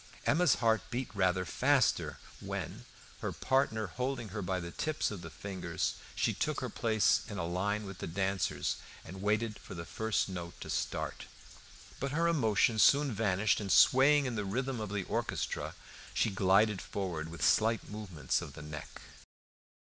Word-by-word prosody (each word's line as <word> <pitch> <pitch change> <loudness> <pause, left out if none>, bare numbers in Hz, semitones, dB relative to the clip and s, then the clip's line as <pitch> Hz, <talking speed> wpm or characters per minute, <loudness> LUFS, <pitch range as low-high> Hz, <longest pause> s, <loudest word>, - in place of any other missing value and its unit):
Emma's 165 -1 +4
heart 110 -3 +2
beat 125 +1 -3
rather 95 -2 +2
faster - - +2 0.2
when, - - -5 0.3
her - - -2
partner 130 -5 +1
holding 125 +3 -3
her 105 +2 -4
by 95 0 -1
the 85 0 -6
tips 155 - -1
of 100 -4 -6
the 80 - -7
fingers, 85 +2 -3 0.2
she - - +1
took - - -1
her - - -4
place 110 -2 +3
in 105 - -5
a 85 - -1
line 100 +5 -1
with 95 -1 -8
the - - -4
dancers, 95 +3 -1 0.3
and 95 +3 -8
waited 110 +1 0
for - - -10
the 85 0 -6
first 110 +3 0
note 90 -3 -6
to - - -6
start. - - -3 0.7
But 140 +1 -2
her 165 +2 +2
emotion 115 -7 +3
soon 140 +4 +5
vanished, 105 -1 +2
and, 100 -3 -3
swaying 140 +3 +6
to 130 - -1
the 110 -3 -2
rhythm 125 +5 -2
of 105 -2 -4
the 100 -1 -2
orchestra, - - -2 0.4
she 110 - +2
glided 100 +2 +3
forward 85 -5 -4
with 85 0 -2
slight 110 0 +3
movements 100 -7 -2
of 70 - -8
the 75 - -9
neck. 75 0 -8
105 Hz, 170 wpm, -32 LUFS, 95-115 Hz, 0.7 s, swaying